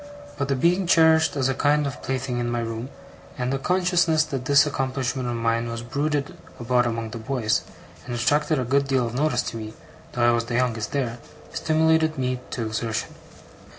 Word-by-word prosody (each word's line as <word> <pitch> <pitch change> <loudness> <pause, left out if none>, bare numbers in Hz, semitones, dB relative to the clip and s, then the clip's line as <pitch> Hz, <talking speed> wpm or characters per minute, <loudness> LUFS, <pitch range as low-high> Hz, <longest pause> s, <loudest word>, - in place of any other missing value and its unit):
But 140 -1 -2
the 135 - +1
being 175 +7 +2
cherished 160 -3 +5
as 135 -2 +1
a 135 - +1
kind 145 +2 +2
of 140 - -5
plaything 130 -2 -2
in 120 0 -1
my 120 0 -1
room, 115 +2 -4 0.5
and 125 0 -1
the 135 - -1
consciousness 175 -1 +2
that 135 -4 -5
this 140 +1 +5
accomplishment 130 -2 -2
of 120 - -2
mine 115 0 0
was 115 0 -5
bruited 145 +3 -2 0.2
about 120 0 +2
among 115 -1 -3
the 115 - -6
boys, 115 -2 0 0.5
and 120 - -3
attracted 145 +6 +2
a 130 - 0
good 140 +3 +1
deal 130 -2 +2
of 115 - -4
notice 150 +4 +1
to 115 - -5
me 110 0 -7 0.4
though 120 -1 +2
I - - +6
was 115 0 0
the 120 0 -3
youngest 115 -4 0
there, 120 -4 -2 0.3
stimulated 160 0 +2
me 130 -1 -1
to 115 - -3
exertion. 110 0 -3
130 Hz, 195 wpm, -24 LUFS, 120-145 Hz, 0.5 s, I